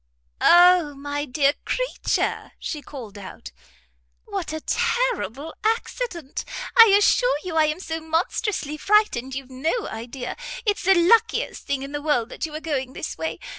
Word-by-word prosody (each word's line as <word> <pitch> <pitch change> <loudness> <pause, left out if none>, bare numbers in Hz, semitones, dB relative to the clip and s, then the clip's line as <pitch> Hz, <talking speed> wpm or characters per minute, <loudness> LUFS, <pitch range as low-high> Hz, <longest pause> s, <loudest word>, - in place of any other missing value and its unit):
"O 350 -4 +6
my 285 +1 -4
dear 280 +1 +2
creature," - - -2
she 300 - -5
called 230 -9 -9
out, 185 - -10 0.7
"what - - -4
a 315 - -3
terrible 345 - -1
accident! 440 - -2 0.3
I 460 - +11
assure 410 +2 +4
you 355 -3 -5
I 315 -1 +5
am 305 +3 -1
so 325 -3 -4
monstrously 320 - -1
frightened 300 - +2
you've 270 -1 -7
no 320 - -1
idea. 245 +3 -6 0.3
It's 410 -4 0
the 385 +1 +6
luckiest 440 +7 +2
thing 275 -1 -1
in 275 - -7
the 290 0 -4
world 290 -6 0
that - - -4
you - - -12
were 305 - -5
going 270 -5 -3
this 310 - -5
way. 320 - -4
310 Hz, 155 wpm, -23 LUFS, 275-380 Hz, 0.7 s, I